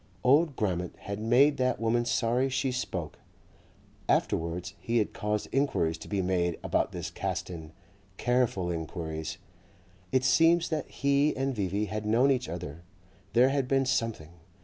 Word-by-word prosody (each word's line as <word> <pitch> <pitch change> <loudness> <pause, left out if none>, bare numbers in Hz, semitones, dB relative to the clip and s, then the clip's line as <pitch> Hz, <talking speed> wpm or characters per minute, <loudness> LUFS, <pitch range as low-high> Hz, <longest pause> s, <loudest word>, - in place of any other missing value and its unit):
Old 145 +3 +4
Grammont 90 -5 -2
had 100 +1 -5
made 125 +7 +4
that 130 -1 +1
woman 115 +1 +1
sorry 120 +2 +1
she 130 0 0
spoke. 90 - -4 0.9
Afterwards 85 +3 0
he 120 +1 -1
had 105 - +1
caused 105 0 -2
enquiries 135 - +1
to - - -10
be 100 -2 -1
made 90 -2 0
about - - 0
this - - -5
Caston, 80 -3 -4 0.5
careful 120 -8 +1
enquiries. 80 0 -4 0.7
It 130 - +2
seems 165 +5 +4
that 155 -4 -2
he 140 +2 +1
and 135 0 0
V.V. 100 0 -1
had 105 +1 -4
known 120 +6 +4
each 125 -2 0
other, 85 -2 -6 0.5
there 125 +3 +5
had 135 -2 0
been 135 0 +2
something. 115 -11 -1
115 Hz, 150 wpm, -29 LUFS, 90-130 Hz, 0.9 s, there